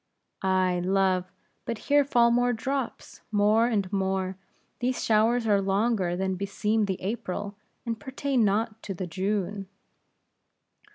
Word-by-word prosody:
"Ay, 185 -2 +2
love! 185 -1 +1 0.3
but 230 - -3
here 290 +5 +3
fall 240 -4 +4
more 245 +1 +3
drops, 265 +3 -4
more 215 +2 +4
and 205 -5 -1
more; 190 -1 0 0.4
these 250 +1 -1
showers 225 +2 +3
are 205 -2 +3
longer 195 -2 +1
than 190 +1 -1
beseem 205 +3 0
the 190 -2 -3
April, 205 -1 -4 0.3
and 230 -2 -3
pertain 270 -2 0
not 215 +2 0
to 195 - -5
the 185 - -4
June." 195 +2 -2
205 Hz, 130 wpm, -27 LUFS, 190-230 Hz, 0.4 s, fall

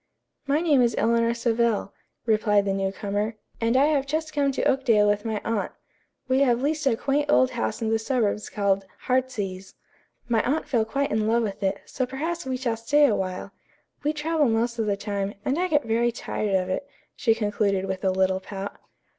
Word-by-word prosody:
"My 290 +3 +2
name 300 -6 +4
is 235 -2 +2
Eleanor 230 0 +2
Savell," 235 -3 0 0.3
replied 210 -3 +3
the 195 - 0
new 195 0 -1
comer, 205 +3 -2 0.3
"and 230 +2 +2
I 275 - +5
have 290 -3 +1
just 310 +2 -2
come 280 -2 +2
to - - -2
Oakdale 230 -6 +3
with 205 +1 +1
my 220 -2 -1
aunt. 225 -2 -1 0.5
We 260 +1 +2
have 245 -4 +3
leased 300 0 0
a 230 -4 +2
quaint 285 +3 0
old 260 -3 +4
house 240 -1 -2
in 220 - 0
the 225 - +2
suburbs 220 -3 -1
called 195 -2 0
'Heartsease.' 220 -8 -2 0.5
My 230 -2 +2
aunt 295 +5 -1
fell 230 -4 +1
quite 280 +5 -1
in 215 0 +1
love 230 +1 +2
with 200 -3 -4
it, 195 -1 -1
so 255 -1 -3
perhaps 310 +4 -4
we 260 -1 -1
shall 240 -3 -1
stay 290 +6 +4
awhile. 190 -5 -1 0.5
We 295 - +2
travel 310 -2 +1
most 235 +1 0
of 220 - 0
the 200 -1 0
time, 200 -1 -3
and 275 +5 0
I 365 - +1
get 295 -4 +2
very 230 +1 +1
tired 215 -3 -2
of 185 -1 +1
it," 230 +10 -3 0.3
she 225 -3 +2
concluded 205 -3 0
with 190 0 -4
a 190 - +3
little 190 0 +1
pout. 195 +1 -7
230 Hz, 200 wpm, -25 LUFS, 205-270 Hz, 0.5 s, I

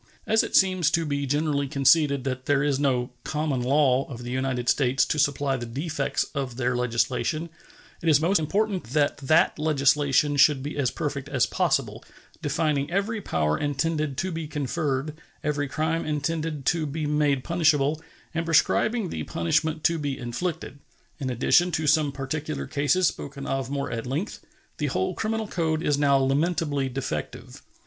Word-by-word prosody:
As 220 0 +3
it - - -3
seems 185 -5 +4
to 165 0 0
be 140 -1 -2
generally 145 0 0
conceded 140 0 +3
that 130 -1 -4
there 145 0 +3
is 145 -2 +1
no 130 -3 0
"common 150 -4 -1
law" 135 0 +3
of 120 -3 -8
the 120 - -5
United 130 -1 -2
States 135 0 +3
to 150 - -1
supply 140 -1 +1
the 120 -1 -6
defects 140 +3 -2
of 130 -3 -4
their 125 -1 0
legislation, 125 +7 -1 0.5
it 165 - +1
is 145 -2 +5
most 175 +5 +2
important 195 +4 -1
that 145 -2 +2
that 155 +5 +2
legislation 145 -1 +2
should 140 -1 +5
be 145 - -5
as 140 -4 +1
perfect 145 -2 -4
as 130 -4 +2
possible, 135 - -1 0.4
defining 150 -1 0
every 200 +4 -1
power 75 - 0
intended 145 0 -1
to 185 +5 -2
be 165 -2 -4
conferred, 150 0 -2 0.2
every 145 -1 -1
crime 160 +4 -1
intended 155 -1 -2
to 160 -2 +1
be 150 +2 -3
made 145 -3 +1
punishable, 160 -3 +2 0.3
and 165 0 -1
prescribing 210 +5 +2
the 80 - -4
punishment 155 - 0
to 170 -1 +2
be 145 -2 -3
inflicted. 145 +4 -4 0.4
In 135 -3 -3
addition 135 +8 +3
to 160 - 0
some 150 0 +3
particular 145 +3 -4
cases 150 +6 +1
spoken 140 0 -5
of 135 -2 -2
more 140 0 -3
at 115 +2 -4
length, 150 +10 -4 0.4
the - - 0
whole - - -1
criminal 220 0 -2
code 160 -5 -1
is 145 -3 +1
now 140 -1 +4
lamentably 145 0 0
defective. 125 - -5
145 Hz, 165 wpm, -25 LUFS, 135-160 Hz, 0.5 s, is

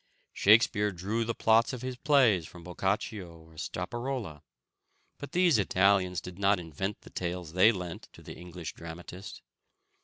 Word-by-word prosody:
Shakespeare 105 0 +4
drew 100 +6 -2
the 115 0 -2
plots 115 +3 +3
of 125 -1 -6
his 130 0 -4
plays 125 - +3
from 85 -1 -13
Boccaccio 95 0 -3
or 80 0 -18
Straparola; 100 - -4 0.8
but 145 - -8
these 175 -8 +4
Italians 95 -3 +2
did 90 +1 -10
not 100 -1 +3
invent 90 +5 -5
the - - -15
tales 90 -2 -4
they 95 +5 +6
lent 90 -5 -7
to - - -15
the - - -9
English 90 -1 -8
dramatist. 85 +3 -9
95 Hz, 150 wpm, -29 LUFS, 90-115 Hz, 0.8 s, they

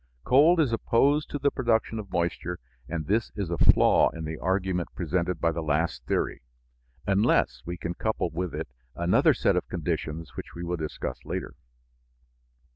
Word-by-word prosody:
Cold 155 +7 +5
is 140 -7 +2
opposed 140 +6 +2
to - - -3
the 140 0 +1
production 115 -3 0
of 100 -2 -7
moisture, 85 +1 -1 0.3
and 80 -2 -3
this 110 +6 0
is 100 -5 -3
a 85 - -1
flaw - - +5
in 80 -1 -7
the 80 0 -5
argument 95 -1 -1
presented 90 0 -1
by 85 - +2
the 85 +1 -3
last 75 -3 -1
theory, - - -1 0.6
unless 100 +4 +2
we 90 +1 -4
can 85 0 -4
couple 110 -3 -1
with 90 -1 -3
it 80 0 -4 0.3
another 85 +1 +3
set - - +2
of - - -1
conditions 75 0 -3
which - - -8
we 85 - -6
will 85 +1 -2
discuss 75 -5 -5
later. - - -4
90 Hz, 170 wpm, -27 LUFS, 80-110 Hz, 0.6 s, Cold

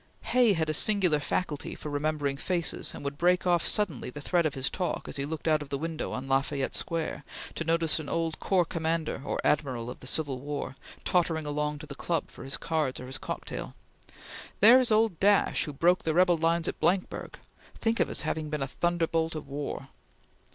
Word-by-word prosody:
Hay 245 -4 +6
had 160 -3 0
a 155 - 0
singular 180 -3 +3
faculty 145 0 -2
for 150 - -7
remembering 145 -1 -1
faces, 170 +3 -2
and - - -8
would 140 0 -4
break 180 +1 +3
off 175 -2 +3
suddenly 185 - +1
the 150 - -8
thread 170 +2 +2
of 145 - -5
his 135 0 0
talk, 180 -2 -2
as - - -4
he 140 - -1
looked 160 +2 -5
out 155 -1 +3
of 145 - -7
the 140 - -1
window 160 +2 -3
on 130 +1 -4
La 135 0 +4
Fayette 140 -1 -3
Square, 165 -3 -3 0.3
to - - -3
notice 165 -1 +2
an 150 -3 -6
old 165 -1 -1
corps 185 -3 +2
commander 160 -3 -2
or - - -2
admiral 130 -5 0
of - - -10
the 125 - -8
Civil 140 -3 -1
War, 145 0 -4 0.3
tottering 165 -3 +2
along 150 0 -1
to 150 - -9
the 145 - -8
club 165 +3 -2
for - - -10
his 135 +1 -2
cards 155 -5 -1
or 125 - -7
his 130 +1 -5
cocktail: - - -5 0.8
"There 235 +5 +9
is 250 -3 +1
old 215 -5 +3
Dash 205 0 +4
who 150 - -5
broke 175 +6 +3
the 160 -1 -1
rebel 180 0 +5
lines 165 0 +1
at - - -3
Blankburg! 185 +1 0 0.4
Think 230 0 0
of - - +3
his - - -2
having 155 -1 -2
been 150 -2 -1
a - - -2
thunderbolt 165 +1 0
of 150 -2 -6
war!" 140 -1 -5
160 Hz, 210 wpm, -29 LUFS, 145-175 Hz, 0.8 s, There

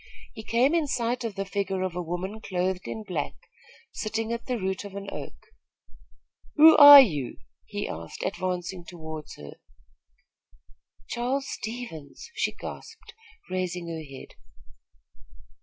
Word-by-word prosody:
He 220 - -8
came 240 +7 +2
in 330 -3 +1
sight 245 -1 -1
of 225 -4 -4
the 195 0 -3
figure 195 -1 -2
of 185 -2 -3
a 180 - -2
woman 180 +5 -5
clothed 185 -1 -2
in 220 - -5
black, 180 -8 -4 0.6
sitting 225 +1 -3
at 235 - -6
the 250 -2 -1
root 190 -1 -3
of 200 -1 -9
an 200 0 -6
oak. - - -7 1.2
"Who 315 +1 +9
are 290 -1 +12
you?" 150 - +2 0.3
he - - -4
asked, 80 0 -7
advancing 180 0 -3
toward 160 -3 -8
her. 75 -1 -11 1.5
"Charles 260 +3 -2
Stevens!" 220 - -7
she - - 0
gasped, - - -10 0.3
raising 180 -2 -3
her 165 -1 -5
head. 135 -3 -11
190 Hz, 135 wpm, -26 LUFS, 175-235 Hz, 1.5 s, are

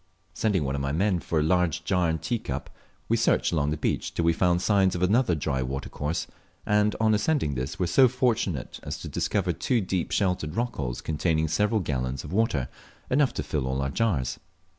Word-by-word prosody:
Sending 100 -7 +1
one 65 -1 -2
of 70 - -2
my 70 0 -1
men 90 +4 +1
for 80 -1 -1
a - - +2
large 90 0 +1
jar 90 -2 +1
and 80 -2 -2
teacup, 120 -2 -3 0.4
we - - +2
searched - - +2
along 75 -4 +1
the 75 - -1
beach - - -1
till 85 - 0
we 85 - +4
found 90 +1 +2
signs 95 -1 +2
of 90 - -1
another 100 -1 +3
dry 70 -3 -1
watercourse, 70 +4 -3 0.4
and 105 0 +2
on 110 0 +3
ascending 105 - +1
this 65 +1 -4
were 90 - 0
so 130 +10 +5
fortunate 120 - -1
as - - -5
to - - -8
discover - - 0
two 125 - 0
deep 95 -4 -2
sheltered 90 -5 0
rock 120 +1 -2
holes - - -3
containing 80 0 0
several 105 +7 +1
gallons 65 -4 -2
of 75 - -8
water, 95 - +1 0.4
enough 140 +1 +3
to - - -4
fill 70 -2 -2
all 65 +1 -1
our 70 0 -1
jars. 75 - 0
85 Hz, 205 wpm, -26 LUFS, 75-105 Hz, 0.4 s, so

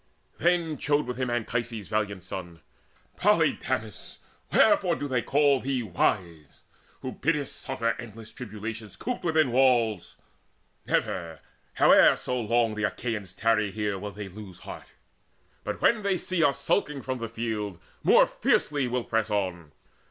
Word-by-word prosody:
Then 170 -4 +1
chode 145 0 +1
with 125 0 -5
him 130 -1 -1
Anchises' 115 -3 -2
valiant 100 -3 -2
son: 85 -3 -7 0.6
"Polydamas, - - 0 0.3
wherefore - - +4
do 145 - -4
they 130 -3 0
call 140 0 +3
thee 130 -2 -1
wise, 85 -5 -2 0.4
Who 130 - -4
biddest 150 -1 -1
suffer 115 -3 -1
endless 115 -2 -9
tribulations 110 -1 -7
Cooped 250 -3 -4
within 160 -6 +2
walls? 120 -6 +2 0.7
Never, 80 -3 -1 0.4
how - - +6
long - - +7
soe'er 120 -2 0
The 105 0 -3
Achaeans 110 -5 -3
tarry 110 0 +2
here, 105 -1 -2
will 105 +2 -5
they 100 +1 -7
lose 95 -1 -11
heart; - - -9 0.8
But - - -4
when 235 -2 +4
they 200 -2 +1
see 175 0 0
us 140 -3 +2
skulking 150 -8 0
from 130 -1 -3
the 115 -1 -4
field, 110 -4 -3 0.2
More - - +6
fiercely 145 -3 +1
will 125 0 -1
press 115 -1 0
on. 90 -7 -2
115 Hz, 145 wpm, -27 LUFS, 105-135 Hz, 0.8 s, long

